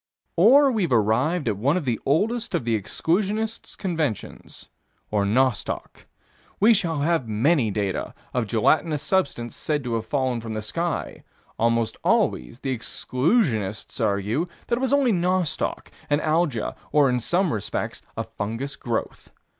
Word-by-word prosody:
Or 265 +10 +6
we've 200 - 0
arrived 120 - +2
at 105 -3 0
one 140 - +2
of 170 - -3
the 120 -4 0
oldest 220 - +1
of - - -1
the 115 -1 +2
exclusionists' 205 - -1
conventions 160 - -4 0.4
or 105 -2 +1
nostoc. 125 +3 -1 0.5
We 220 +3 +6
shall 170 -8 0
have 160 -5 +1
many 115 +4 +2
data 100 -1 -2 0.2
of 125 -3 0
gelatinous 145 +8 +2
substance 140 -11 0
said 150 -2 -2
to 120 -2 -3
have 115 -1 -2
fallen 130 -4 0
from 115 -1 -5
the 110 0 -3
sky: 165 +10 -3 0.4
almost 115 0 +1
always 60 - +1
the 135 -2 -1
exclusionists 125 - 0
argue 105 - 0 0.2
that 235 0 0
it - - -5
was 265 - 0
only 280 -4 +4
nostoc, 180 -2 -1 0.2
an 145 0 +3
Alga, 155 -6 0 0.2
or, 145 -2 +5
in 125 -1 +1
some 175 - +1
respects, 105 -2 -3 0.2
a - - -1
fungous 115 +7 -4
growth. 120 -5 -4
140 Hz, 145 wpm, -24 LUFS, 115-175 Hz, 0.5 s, Or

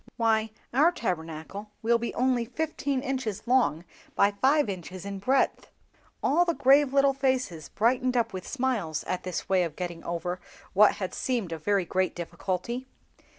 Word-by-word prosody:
Why, 225 -1 +2 0.2
our 300 +7 +5
Tabernacle 180 - -4
will 235 +1 +3
be 235 - -3
only 250 -1 +2
fifteen 280 +1 -2
inches 255 -7 -3
long 235 -10 +2 0.3
by 200 - +4
five 265 +7 +3
inches 185 -1 -6
in 200 -1 -5
breadth." 260 +7 +1 0.6
All 335 +5 +4
the 340 -2 0
grave 275 +1 +5
little 275 0 +4
faces 260 - -1
brightened 250 +2 +1
up 230 -3 +1
with 185 -1 -6
smiles 240 - -1
at 185 - -3
this 185 -2 -4
way 190 -1 +3
of 165 -4 -2
getting 175 -2 -5
over 175 +1 -3 0.3
what 205 +2 +6
had 185 -2 -4
seemed 235 -9 -1
a 165 - -4
very 195 +2 +1
great 185 +2 0
difficulty. 190 +8 -4
220 Hz, 160 wpm, -28 LUFS, 185-260 Hz, 0.6 s, what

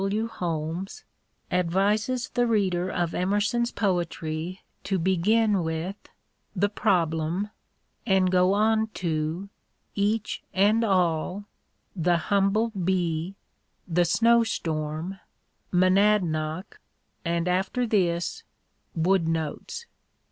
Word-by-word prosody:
W. 210 +3 0
Holmes, 175 - -4 0.5
advises 205 +8 +1
the 245 0 +1
reader 185 -5 +1
of 175 -2 -1
Emerson's 205 +6 +1
poetry 175 -2 -2 0.2
to 195 - 0
begin 195 +4 +2
with 160 +5 -4 0.2
" - - -45
The 205 - +4
Problem 170 +1 0 0.3
" - - -45
and 190 -2 +3
go 185 +1 +4
on 220 +1 +2
to 165 +2 -2 0.2
" - - -46
Each 210 +2 0
and 210 +4 +4
All," 185 -1 +1 0.3
" - - -46
The 175 -1 +2 0.2
Humble 200 +3 +2
Bee," 180 -2 -1 0.3
" - - -46
The 175 - +5
Snowstorm," 175 -5 +1 0.3
" - - -45
Monadnoc," 185 -3 +2 0.4
and 170 0 -1
after 190 +7 0
this 180 - 0 0.3
" - - -44
Wood 170 +1 +2
Notes." 165 - -3
185 Hz, 110 wpm, -26 LUFS, 170-210 Hz, 0.5 s, The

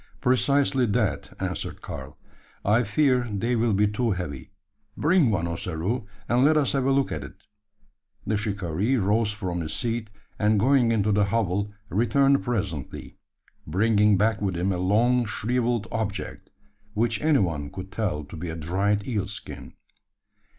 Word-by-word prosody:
"Precisely 135 0 +2
that," 110 -1 0
answered - - -4
Karl; 65 - -8 0.5
"I 110 +4 +4
fear 125 +2 +2
they 115 +5 0
will 115 -1 +2
be 105 +2 +3
too 115 +3 -1
heavy. 75 -9 -4 0.5
Bring 160 -4 +3
one, 90 -6 0
Ossaroo; 85 +7 -3 0.2
and 120 +2 +3
let 155 +2 +5
us 145 -3 +2
have 135 -2 0
a 135 - +3
look 135 0 +1
at 75 -3 -3
it." 70 - -13 0.8
The 110 - 0
shikaree 100 +2 -1
rose 105 +1 +2
from 95 -5 -3
his 80 -1 -4
seat; 115 -2 -2 0.3
and 105 0 +3
going 125 +1 +4
into 105 -2 +2
the 105 0 +3
hovel, 100 -1 0 0.2
returned 135 +7 +3
presently 95 - -4 0.5
bringing 105 +4 +3
back 110 +1 +1
with 95 -4 -1
him 90 +3 0
a 90 - -1
long 120 +6 +3
shrivelled 120 +1 -1
object, 110 -2 -4 0.5
which 115 +1 0
any 155 -1 +4
one 80 -7 -1
could 95 +6 -8
tell 95 -8 -2
to 70 - -11
be 85 +1 -5
a 80 - -4
dried 100 +6 0
eel 105 -6 -1
skin. 100 +1 -8
105 Hz, 155 wpm, -25 LUFS, 95-120 Hz, 0.8 s, let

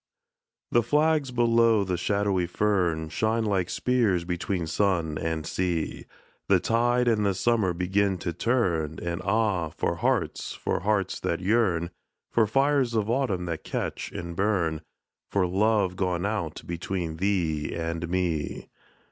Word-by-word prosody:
THE 120 - +4
flags 150 +3 +2
below 115 -3 +3
the 90 -2 -1
shadowy 95 0 0
fern 90 -5 0
Shine 110 +6 0
like 95 -4 0
spears 110 -9 +1
between 90 0 -2
sun 85 -2 0
and 80 -1 -2
sea, 90 -2 -2 0.4
The 95 -2 +5
tide 120 +5 +2
and 110 -3 +3
the 100 -2 +1
summer 105 -1 +2
begin 95 +2 +1
to 85 - -1
turn, 85 - 0
And 85 +1 -3
ah, 100 -4 +1
for - - -2
hearts, - - -1
for - - -2
hearts 100 0 0
that 85 - -1
yearn, 90 -4 +1 0.4
For 110 -2 +3
fires 135 0 +2
of 110 0 +1
autumn 115 -9 0
that 85 -2 -4
catch - - -4
and 85 -1 -6
burn, 85 -6 0 0.5
For 100 -2 +2
love 100 0 +2
gone 90 -1 -1
out 100 -7 -3
between 85 -1 -3
thee 85 -5 0
and 85 0 -3
me. 85 -4 -2
95 Hz, 140 wpm, -26 LUFS, 85-110 Hz, 0.5 s, The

